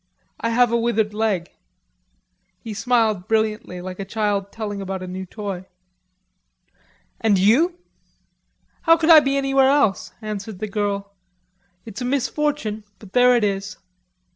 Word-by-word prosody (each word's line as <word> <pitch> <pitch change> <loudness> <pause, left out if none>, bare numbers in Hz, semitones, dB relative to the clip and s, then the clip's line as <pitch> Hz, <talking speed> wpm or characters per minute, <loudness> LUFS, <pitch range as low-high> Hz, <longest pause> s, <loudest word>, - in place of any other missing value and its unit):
I 230 - -1
have 240 +1 +3
a 235 - +2
withered 225 -2 0
leg." 210 -5 -1 1.1
He 225 - -8
smiled 220 -3 +1
brilliantly 215 -4 -1
like 185 +1 -7
a - - -2
child 200 -1 -2
telling 205 -3 -5
about 190 -1 -4
a - - -6
new 185 +1 -6
toy. 195 -2 -6 1.5
"And 215 -3 +3
you?" 270 - +3 1.0
"How 330 0 +5
could 330 0 +3
I 320 - +11
be 275 -1 0
anywhere 270 -1 +3
else?" 275 -9 +2
answered 215 -1 -6
the 215 - -4
girl. 200 -1 -3 0.7
"It's 225 +1 -8
a - - -2
misfortune, 275 -4 -1
but 200 -3 -15
there 250 0 +5
it 235 - +2
is." 195 -1 -2
215 Hz, 140 wpm, -22 LUFS, 200-245 Hz, 1.5 s, I